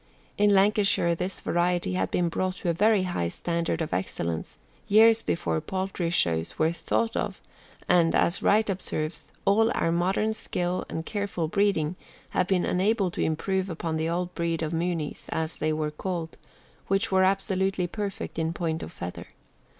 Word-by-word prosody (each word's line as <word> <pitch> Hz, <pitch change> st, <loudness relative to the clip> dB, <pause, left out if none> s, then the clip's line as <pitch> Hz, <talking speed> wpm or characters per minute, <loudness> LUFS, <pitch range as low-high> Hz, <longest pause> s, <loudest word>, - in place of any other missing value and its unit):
In 205 Hz, 0 st, +4 dB
Lancashire 200 Hz, -3 st, +3 dB
this 180 Hz, +3 st, -3 dB
variety 175 Hz, -, 0 dB
had 95 Hz, +1 st, 0 dB
been 175 Hz, -, +1 dB
brought 185 Hz, +2 st, -1 dB
to 180 Hz, -, -3 dB
a -, -, +2 dB
very 210 Hz, +2 st, +3 dB
high 175 Hz, -, -1 dB
standard 170 Hz, -, -2 dB
of 155 Hz, -, -5 dB
excellence 85 Hz, -3 st, -3 dB, 0.3 s
years 225 Hz, +2 st, +6 dB
before 80 Hz, -, -1 dB
poultry 190 Hz, -2 st, -2 dB
shows 85 Hz, -, +1 dB
were 160 Hz, +1 st, +3 dB
thought 225 Hz, +6 st, -1 dB
of, -, -, -2 dB, 0.5 s
and, 170 Hz, -2 st, +4 dB
as 170 Hz, -, +2 dB
Wright 215 Hz, +2 st, +3 dB
observes, 160 Hz, -5 st, -3 dB
all 225 Hz, +3 st, +4 dB
our 165 Hz, -, +1 dB
modern 190 Hz, +6 st, +1 dB
skill 180 Hz, -4 st, -2 dB
and 160 Hz, -, -4 dB
careful 200 Hz, -5 st, -2 dB
breeding 180 Hz, -3 st, +1 dB, 0.3 s
have 185 Hz, -, +1 dB
been 190 Hz, -2 st, +2 dB
unable 195 Hz, +1 st, +1 dB
to -, -, -4 dB
improve 190 Hz, +4 st, 0 dB
upon 165 Hz, -1 st, -3 dB
the 160 Hz, +1 st, -1 dB
old 175 Hz, +1 st, -2 dB
breed 165 Hz, -1 st, -1 dB
of 160 Hz, +1 st, -2 dB
Mooneys, 165 Hz, -2 st, -2 dB
as 160 Hz, +1 st, -2 dB
they 155 Hz, +1 st, 0 dB
were 155 Hz, -1 st, -1 dB
called, 165 Hz, 0 st, -4 dB, 0.5 s
which 195 Hz, +1 st, +1 dB
were 190 Hz, 0 st, +4 dB
absolutely 190 Hz, -1 st, +1 dB
perfect 200 Hz, -2 st, -4 dB
in 160 Hz, 0 st, 0 dB
point 165 Hz, -2 st, -2 dB
of -, -, -7 dB
feather. 90 Hz, +1 st, -7 dB
175 Hz, 165 wpm, -27 LUFS, 160-195 Hz, 0.5 s, years